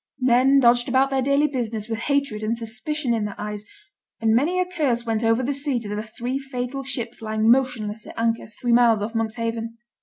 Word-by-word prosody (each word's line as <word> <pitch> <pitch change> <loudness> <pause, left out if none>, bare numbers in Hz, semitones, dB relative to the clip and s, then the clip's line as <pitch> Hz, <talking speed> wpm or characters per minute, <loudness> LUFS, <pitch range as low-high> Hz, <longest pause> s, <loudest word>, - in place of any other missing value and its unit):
Men 260 +2 +4
dodged 240 -1 +4
about 265 +2 +3
their 265 -1 +1
daily 280 +3 +3
business 230 -6 -2
with 225 -1 -3
hatred 280 -4 0
and 220 +2 -1
suspicion 240 +4 -2
in 220 -2 0
their 205 - -7
eyes, 210 0 -5 0.5
and 225 -1 +2
many 310 +10 +2
a 365 - +2
curse 285 -10 -1
went 225 0 -1
over 225 +2 +2
the 280 +3 0
sea 280 -1 -1
to 225 - -7
the 210 - -2
three 240 +4 -4
fatal 270 0 -4
ships 240 -3 -4
lying 220 0 +2
motionless 230 -5 0
at - - -11
anchor 230 0 0
three 235 +2 -3
miles 230 -3 +4
off 220 +2 -4
Monkshaven. 230 0 -3
235 Hz, 205 wpm, -23 LUFS, 225-270 Hz, 0.5 s, Men